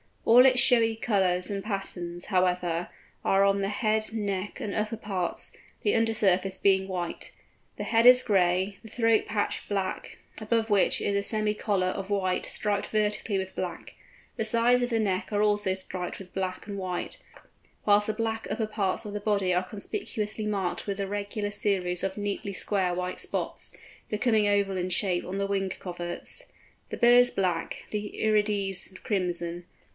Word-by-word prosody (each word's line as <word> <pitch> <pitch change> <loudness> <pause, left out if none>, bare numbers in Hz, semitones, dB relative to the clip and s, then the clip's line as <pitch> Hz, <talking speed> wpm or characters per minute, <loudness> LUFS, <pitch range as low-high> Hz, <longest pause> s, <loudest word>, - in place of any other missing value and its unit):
All 250 +3 +8
its 255 -1 +4
showy 230 -3 +4
colours 190 -5 +1
and 195 -1 -3
patterns, 175 -4 -4
however, 180 -2 0 0.3
are 195 0 +3
on 200 0 +3
the 195 - 0
head, 215 +1 0
neck, 200 -3 -3
and 205 - -4
upper 215 +1 -2
parts, 195 -5 -3 0.3
the 415 - +2
under 225 0 +2
surface 190 -3 +2
being 190 -1 +3
white. 180 -3 -4 0.5
The - - -3
head 230 0 +2
is 250 0 +8
gray, 190 -1 +2
the - - -12
throat 225 0 +2
patch 210 -1 -2
black, 195 -2 -3 0.2
above 225 +1 0
which 200 -2 +3
is 200 - 0
a 200 - +2
semi 215 0 +1
collar 200 -4 0
of 190 +1 -3
white 185 -3 0
striped 205 -1 -1
vertically 210 -1 0
with 190 0 -4
black; 180 -2 -5 0.4
the 225 - 0
sides 235 +2 +4
of 245 - 0
the 230 -2 +1
neck 195 -3 -1
are 205 0 +2
also 205 -2 +2
striped 185 -1 -5
with 190 -2 -12
black 185 -1 -3
and 200 -2 -5
white; 185 -2 -4 0.7
whilst 205 0 +4
the 215 - 0
black 225 0 -2
upper 220 - -1
parts 205 -3 -1
of 205 - -6
the 210 - -2
body 200 -3 +1
are 180 +1 +2
conspicuously 215 - -4
marked 195 -3 -2
with 200 0 -3
a 195 - -1
regular 205 +1 -3
series 185 -4 0
of 195 +1 -2
nearly 205 0 -3
square 185 -1 +1
white 180 0 -3
spots, - - -1 0.3
becoming 215 -1 +2
oval 200 -2 +1
in 180 0 -2
shape 180 -1 0
on 185 +2 -4
the 200 0 -1
wing 195 -1 -1
coverts: 175 -2 -5 0.4
the - - -5
bill 240 0 +6
is 245 0 +7
black, 180 -6 -2
the 210 0 -3
irides 205 -3 +1
crimson. 175 -3 -2
200 Hz, 175 wpm, -27 LUFS, 185-215 Hz, 0.7 s, All